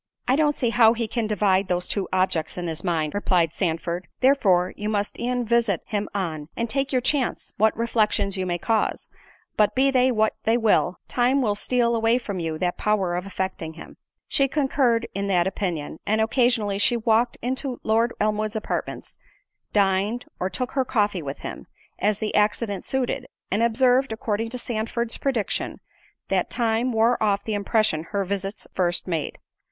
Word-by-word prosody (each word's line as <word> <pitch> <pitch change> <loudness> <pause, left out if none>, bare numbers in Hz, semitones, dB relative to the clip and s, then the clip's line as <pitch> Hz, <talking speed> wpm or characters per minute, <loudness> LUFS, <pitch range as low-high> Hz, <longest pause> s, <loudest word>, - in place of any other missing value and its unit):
"I 255 - +4
don't 295 0 +2
see 240 -3 0
how 225 -1 +6
he 230 -1 -2
can 225 0 -2
divide 200 -2 +2
those 180 -1 -1
two 200 -2 -2
objects 185 -4 0
in 175 - -3
his 165 0 -4
mind," 160 -5 0
replied 180 -5 +1
Sandford, 170 0 -2
"therefore 195 -10 +3
you 210 +1 -3
must 205 -1 -2
e'en 245 0 -1
visit 230 -5 +1
him 210 -2 -2
on, 160 -6 -3
and 235 - -1
take 275 +3 -1
your 255 -2 +2
chance, 265 0 -1
what 220 +1 +3
reflections 215 -4 +1
you 185 -1 -2
may 175 -1 0
cause—but, 220 - -2
be 270 +1 +4
they 255 0 +3
what 220 -2 +2
they 225 +2 +3
will, 220 -5 +2
time 250 +3 +2
will 210 -3 +2
steal 235 +2 +1
away 225 +1 +3
from 205 -7 -4
you 160 -2 -3
that 175 +1 -2
power 195 -5 +1
of 180 +2 -3
affecting 185 -4 -4
him." 165 - -11 0.3
She 275 - +2
concurred 265 -5 +1
in 200 0 -2
the 190 -3 +3
opinion, 175 -4 -2
and 215 +1 +2
occasionally 220 -3 +2
she 240 +3 +4
walked 230 +1 +2
into 260 +1 -2
Lord 225 +2 +2
Elmwood's 215 +1 0
apartments, 215 - -4 0.5
dined, 200 +4 +1
or 185 - -1
took 250 +7 -3
her 270 - +1
coffee 205 -7 0
with 140 -2 -6
him, - - -7 0.3
as 210 0 +1
the 215 0 -3
accident 210 -1 +1
suited; 265 0 -2 0.2
and 205 +4 +1
observed, 250 +2 +3
according 220 0 -2
to 250 - -5
Sandford's 235 0 -2
prediction, 250 -7 -2 0.5
that - - +1
time 235 +1 0
wore 230 +1 +2
off 205 -2 +1
the 220 - -3
impression 205 -5 +1
her 200 +2 -2
visits 195 +1 -4
first 175 -1 0
made. 165 -5 -2
215 Hz, 175 wpm, -24 LUFS, 190-240 Hz, 0.5 s, how